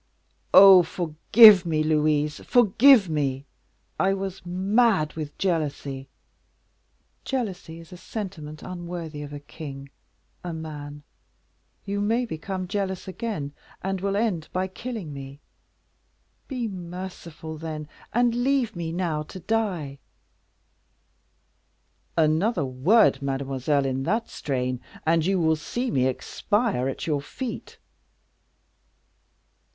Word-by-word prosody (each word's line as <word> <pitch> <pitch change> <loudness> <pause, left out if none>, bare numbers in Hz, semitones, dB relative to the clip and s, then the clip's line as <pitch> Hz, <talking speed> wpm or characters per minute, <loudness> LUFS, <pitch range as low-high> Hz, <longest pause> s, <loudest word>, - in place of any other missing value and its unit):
"Oh! 190 -1 +10
forgive 180 +5 +6
me, 155 -3 0
Louise, 150 -1 +1
forgive 240 -1 +5
me! 140 -3 -1 0.5
I 195 0 +3
was 195 -1 -5
mad 190 -1 +2
from 155 -2 -5
jealousy." 145 -6 -2 1.2
"Jealousy 190 -10 -4
is 165 +1 -13
a - - -9
sentiment 175 -6 -7
unworthy 170 -4 -6
of 145 -1 -7
a 145 - -6
king 140 -1 -9 0.5
a 175 -1 -4
man. 150 -2 -7 0.8
You 200 0 -2
may 230 +4 +1
become 185 0 -5
jealous 190 -1 -3
again, 190 -8 -4 0.3
and 195 0 -2
will 200 0 -1
end 200 -7 -1
by 185 +1 -1
killing 195 - -6
me. 140 0 -9 1.1
Be 250 -4 -3
merciful, 175 -4 -8
then, 155 -2 -5 0.2
and 240 0 +2
leave 245 -2 +1
me 170 -1 -4
now 165 -3 -1
to 155 +5 -9
die." 180 -8 -2 2.2
"Another 160 - +2
word, 135 - +3
mademoiselle, 135 +1 -1
in 135 0 -1
that 220 +7 -1
strain, 125 -2 -2 0.2
and 165 0 +3
you 195 -1 +2
will 160 -1 +3
see 240 +11 -3
me 130 -1 +2
expire 200 - -1
at 135 - -5
your 150 -3 0
feet." 240 - -7
170 Hz, 115 wpm, -25 LUFS, 150-200 Hz, 2.2 s, Oh